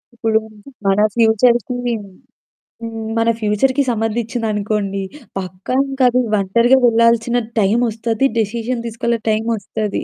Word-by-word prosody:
ఇప్పుడు 225 -1 +1 0.5
మన 195 +1 +3 0.2
ఫ్యూచర్‌కీ 235 +1 +3 0.3
హ్మ్. 200 -1 -13 1.1
మన 230 0 +1
ఫ్యూచర్‌కి 255 +6 +1
సంబంధించిందనుకోండి. 215 -3 -2 0.4
పక్కా 185 +6 -5
ఇంకది 255 -2 +2 0.2
ఒంటరిగా 235 +7 +3
వెళ్ళాల్సిన 230 +1 +3 0.2
టైమొస్తది. 225 +3 +1
డిసిషన్ 230 +3 -2
తీసుకెళ్ళే 235 +1 -1
టైమొస్తది. 220 -1 -2
225 Hz, 90 wpm, -18 LUFS, 210-240 Hz, 1.1 s, మన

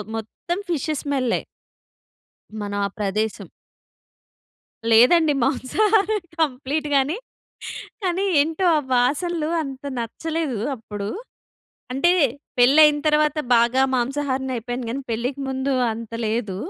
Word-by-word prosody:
మొత్తం 280 - -4
ఫిషేస్ 310 -2 -1
స్మెల్లే... 265 -4 0 1.2
మనం 205 0 -3
ఆ - - 0
ప్రదేశం. 210 +1 -2 1.4
లేదండి 295 +7 +6
మాంసాహారం 415 - +2 0.2
కంప్లీట్ 290 +1 -1
గానే 280 +8 +2 0.9
కానీ 370 +1 0 0.2
ఏంటో 325 +5 +1
ఆ - - +3
వాసనలు 305 +6 +1
అంత 270 0 -8
నచ్చలేదు 300 +1 -3 0.2
అప్పుడు. 205 -3 -6 0.9
అంటే 345 +7 +3 0.5
పెళ్లి 270 +6 +6
అయిన 295 -1 +4
తర్వాత 300 0 +2 0.2
బాగా 240 +3 +3
మాంసాహారిని 265 +1 -1
అయిపోయాను 245 +1 -4
కానీ 270 +3 -3
పెళ్ళికి 250 +5 -2
ముందు 265 +1 -1 0.2
అంత 230 0 -8
లేదు. 215 -4 -2
270 Hz, 105 wpm, -22 LUFS, 235-310 Hz, 1.4 s, లేదండి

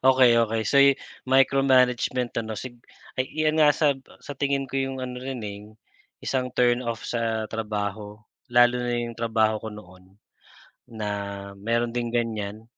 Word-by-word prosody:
Okey, 130 -3 +6
okey. 110 +1 -1
So 140 - +3
yu 140 0 +7 0.3
micro-management 130 -2 +3
ano 110 -1 -5
sig 120 +3 -7 0.4
ay 130 - -1
iyan 155 0 +1
nga 150 - +7
sab 145 -4 +2 0.2
sa - - -7
tingin 140 0 -1
ko 135 - -11
yung 135 0 -2
ano 125 0 -6
rin, 130 -1 -5
eh, 100 -1 -6 0.6
isang 130 -1 -1
turn-off 120 -2 +1
sa 115 -2 -1
trabaho. 105 -1 -4 0.3
Lalo 120 0 +5
na 120 0 -1
yung 120 0 -3
trabaho 110 -2 +1
ko 110 - -6
noon, 95 -2 -14 0.7
na 110 -2 -5 0.5
meron 115 +2 0
ding 120 -1 -1
ganyan. 110 -3 -2
120 Hz, 150 wpm, -25 LUFS, 110-130 Hz, 0.7 s, yu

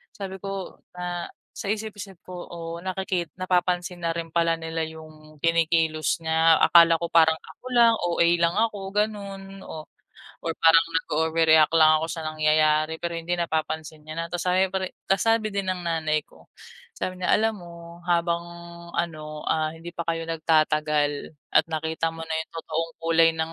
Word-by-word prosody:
sabi 195 -3 -6
ko 195 -1 -6 0.2
na 175 -1 -4 0.3
sa - - -6
isip-isip 205 -4 -6
ko, 180 -1 -7
"Oh 165 0 -6
nakiki 185 -2 -2
napapansin 180 -1 0
na 165 - +1
rin 165 -1 -4
pala 165 -1 +3
nila 165 0 -3
yung 155 -1 -13
kinikilos 165 -2 +2
niya. 160 0 +4
Akala 170 -1 +6
ko 170 - -1
parang 160 -1 +5
ako - - -16
lang. 235 -1 +6
OA 170 -1 +2
lang 170 0 +2
ako, 220 -2 0 0.2
ganon, 195 -2 -3
oh, 155 -1 -8 0.6
or 165 - -1
parang 165 0 +6 0.2
nag-overreact 160 0 +3
lang 155 -1 +7
ako 160 - -2
sa 165 - -4
nangyayari." 155 0 +2
Pero 170 0 -2
hindi, 170 +2 -4
napapansin 160 -2 -3
niya 155 - -7
na 165 - -1
tapos 175 - -2
sabi 185 +1 +3
pari 190 -1 -1 0.2
tapos 195 0 +2
sabi 225 -1 +2
din 200 -1 -2
ng 180 - -6
nanay 155 -2 0
ko - - -21 0.5
sabi 185 0 -4
niya, 180 - -1
"Alam 220 +1 +2
mo, 170 -1 -11 0.3
habang 170 0 +2 0.6
ano, 155 -3 -4
ah, 155 -1 +1
hindi 165 +1 -9
pa 170 - -7
kayo 165 0 -1
nagtatagal 155 -2 +1 0.2
at - - +5
nakita 160 0 -2
mo 165 - -7
na 160 - -6
yung - - -20
totoong 165 0 -3
kulay 165 0 +5
ng 160 0 -2
165 Hz, 170 wpm, -25 LUFS, 160-180 Hz, 0.6 s, lang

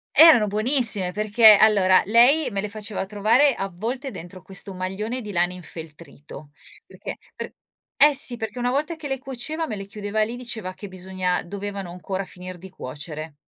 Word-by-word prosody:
Erano 305 -10 +8
buonissime 215 -3 +1
perché 215 +2 +6
allora 200 -3 +5
lei 250 +7 +4
me 200 - -2
le 210 - -2
faceva 210 -1 -5
trovare 220 +8 +3
avvolte 225 +9 -4
dentro 175 0 -10
questo 195 +2 -2
maglione 195 +7 -4
di 210 -3 -7
lana 175 -1 +1
infeltrito, 160 -4 -11 0.3
perché - - -8 0.2
per - - -8 0.4
eh 295 0 +6
sì, 265 -3 +2
perché 220 -1 -6
una 245 0 0
volta 305 +5 -1
che 315 -2 -7
le 270 -1 -3
cuoceva 280 +5 -5
me 215 - -4
le 195 -1 -6
chiudeva 210 +1 -2
lì 230 +3 -4
diceva 225 -6 -6
che 205 - -9
bisogna 185 -1 -3
dovevano 200 0 -6
ancora 190 +2 -5
finir 180 0 -9
di 190 +2 -11
cuocere. 150 +1 -8
205 Hz, 170 wpm, -23 LUFS, 185-240 Hz, 0.4 s, Erano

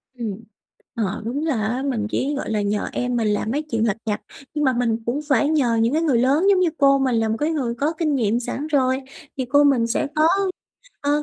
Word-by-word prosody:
Ừm. 230 -5 -4 0.6
Ờ, 215 -2 -2
đúng 280 +7 -2
là 225 -9 0
á, 250 +4 -2
mình 220 -5 -1
chỉ 285 +2 -1
gọi - - -4
là 215 -1 0
nhờ 205 +1 -1
em 250 0 -2
mình 230 -2 +1
làm 210 +1 0
mấy 290 +4 0
chuyện 230 -7 -1
lặt 210 +1 0
vặt. 210 -1 -2 0.3
Nhưng 300 -1 -1
mà 260 - +3
mình 235 -2 0
cũng 250 +5 -1
phải 285 +1 +3
nhờ 265 -7 +2
những 230 +4 +2
cái 320 - +2
người 295 -7 +2
lớn 285 +9 +3
giống 385 -2 +4
như 355 -2 +3
cô 275 -1 +4
mình 260 -3 +1
là 225 -1 +1
một 220 - 0
cái 300 +2 0
người 260 -7 -1
có 290 +7 -1
kinh 305 -4 +1
nghiệm 230 -2 +1
sẵn 270 +4 -4
rồi, 260 -4 +2 0.4
thì 260 - -1
cô 285 +3 +4
mình 260 -5 +3
sẽ 235 - 0
có, 310 +1 +4 0.7
ờ, 290 +1 +1
255 Hz, 245 wpm, -22 LUFS, 230-290 Hz, 0.7 s, giống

